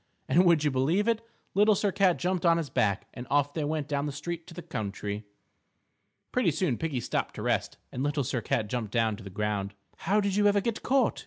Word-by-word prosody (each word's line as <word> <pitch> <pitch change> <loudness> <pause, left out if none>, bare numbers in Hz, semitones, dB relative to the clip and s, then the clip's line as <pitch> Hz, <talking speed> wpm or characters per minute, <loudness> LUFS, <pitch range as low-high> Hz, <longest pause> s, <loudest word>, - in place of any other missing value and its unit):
And, 180 +3 +4
would 170 -4 +5
you 150 - +2
believe 155 - +1
it? 230 -1 +2 0.3
Little 210 +1 +5
Sir 200 +1 +1
Cat 190 -2 +3
jumped 180 -1 -1
on 170 -1 +5
his 160 -4 -3
back, 100 -2 +1
and 120 - -8
off 145 0 +2
they 155 - -2
went 150 -1 -2
down 145 0 -1
the - - -2
street 165 +4 -5
to 165 - -11
the 175 - -7
country. 105 - -4 1.1
Pretty 250 -8 +2
soon 155 -5 0
Piggie 155 -6 -1
stopped - - -2
to - - -5
rest, - - 0
and 125 - -4
Little 145 0 0
Sir 120 0 -2
Cat 115 -3 0
jumped 110 -2 -3
down 115 -2 +1
to 110 - -11
the 100 - -8
ground. 100 0 -2 0.2
"How 205 +2 +1
did 200 -2 0
you 205 0 +4
ever 205 0 +4
get 225 +2 -2
caught?" 265 -2 +2
150 Hz, 230 wpm, -28 LUFS, 120-185 Hz, 1.1 s, would